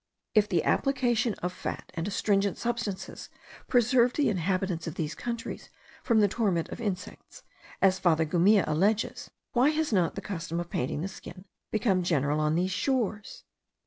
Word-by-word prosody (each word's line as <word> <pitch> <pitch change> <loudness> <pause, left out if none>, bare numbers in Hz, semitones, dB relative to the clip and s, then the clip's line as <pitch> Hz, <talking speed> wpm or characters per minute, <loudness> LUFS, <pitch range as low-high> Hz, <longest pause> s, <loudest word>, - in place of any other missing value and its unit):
If 210 -2 +4
the 175 - +1
application 245 -5 +1
of 180 0 -1
fat - - -6
and 165 0 -3
astringent* 200 -1 +1
substances 230 -5 -4 0.4
preserved 245 0 +3
the 295 - +2
inhabitants 185 -2 -1
of 160 - -5
these 155 -1 -2
countries 235 -1 -5 0.3
from 225 -3 +3
the 205 - +5
torment 190 -6 0
of - - -7
insects, 210 - -6 0.4
as 190 -1 +4
Father 165 -3 +3
Gumilla 180 +6 +4
alleges, 200 +8 0 0.2
why 255 +4 +4
has 310 -4 0
not 180 -5 +2
the - - -4
custom 170 -4 -4
of 175 0 -5
painting 130 +4 -2
the 185 - -2
skin 190 -1 -11 0.2
become 205 -4 +1
general 150 -4 +1
on 155 0 +1
these 180 +2 +1
shores? 220 -1 -2
195 Hz, 160 wpm, -28 LUFS, 170-230 Hz, 0.4 s, the